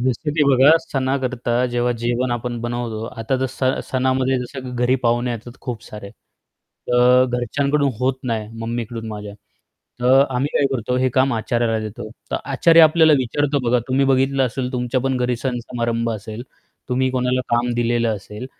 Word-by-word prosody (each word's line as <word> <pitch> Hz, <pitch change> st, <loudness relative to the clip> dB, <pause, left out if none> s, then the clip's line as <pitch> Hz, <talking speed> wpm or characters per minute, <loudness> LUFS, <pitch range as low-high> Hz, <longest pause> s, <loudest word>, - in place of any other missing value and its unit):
जसं 130 Hz, +4 st, -1 dB
की 155 Hz, -, +3 dB
बघा 135 Hz, +3 st, +6 dB
सणाकरता 130 Hz, -5 st, -2 dB, 0.2 s
जेव्हा 120 Hz, 0 st, 0 dB
जेवण 120 Hz, +1 st, 0 dB
आपण 120 Hz, 0 st, -3 dB
बनवतो. 120 Hz, -2 st, -4 dB
आता 120 Hz, +2 st, -3 dB
तर 130 Hz, -, +1 dB
स 130 Hz, +1 st, -5 dB, 0.3 s
सणामध्ये 130 Hz, 0 st, +1 dB
जसं 130 Hz, +2 st, -7 dB
की 125 Hz, -, -6 dB
घरी 125 Hz, +1 st, +3 dB
पाहुणे 120 Hz, +1 st, +1 dB
येतात 120 Hz, +2 st, -7 dB
खूप 120 Hz, -3 st, -6 dB
सारे, 105 Hz, -2 st, -9 dB
तर 125 Hz, +3 st, 0 dB
घरच्यांकडून 140 Hz, +4 st, 0 dB
होत 130 Hz, +1 st, +1 dB
नाही, 110 Hz, -3 st, -2 dB
मम्मीकडून 115 Hz, 0 st, -4 dB
माझ्या. 105 Hz, -1 st, -7 dB, 0.7 s
तर 130 Hz, +3 st, +5 dB
आम्ही 135 Hz, +3 st, 0 dB
काय 140 Hz, -, +3 dB
करतो? 125 Hz, 0 st, -1 dB
हे 130 Hz, +1 st, +2 dB
काम 130 Hz, +2 st, +2 dB
आचाऱ्याला 115 Hz, 0 st, 0 dB
देतो. 110 Hz, 0 st, -7 dB, 0.2 s
तर -, -, 0 dB, 0.2 s
आचारी 165 Hz, +4 st, +5 dB
आपल्याला 160 Hz, 0 st, +6 dB
विचारतो 140 Hz, +3 st, 0 dB
बघा, 125 Hz, +1 st, +3 dB
तुम्ही 135 Hz, +2 st, +2 dB
बघितलं 135 Hz, 0 st, +2 dB
असेल 125 Hz, +1 st, -4 dB
तुमच्या 125 Hz, +1 st, -1 dB
पण 135 Hz, 0 st, 0 dB
घरी 125 Hz, -1 st, 0 dB
सण-समारंभ 120 Hz, -2 st, -2 dB
असेल. 110 Hz, +1 st, -6 dB, 0.5 s
तुम्ही 130 Hz, +1 st, +1 dB
कोणाला 125 Hz, 0 st, 0 dB
काम 120 Hz, +1 st, +1 dB
दिलेलं 120 Hz, -1 st, +1 dB
असेल, 105 Hz, +5 st, -9 dB
125 Hz, 165 wpm, -20 LUFS, 120-130 Hz, 0.7 s, बघा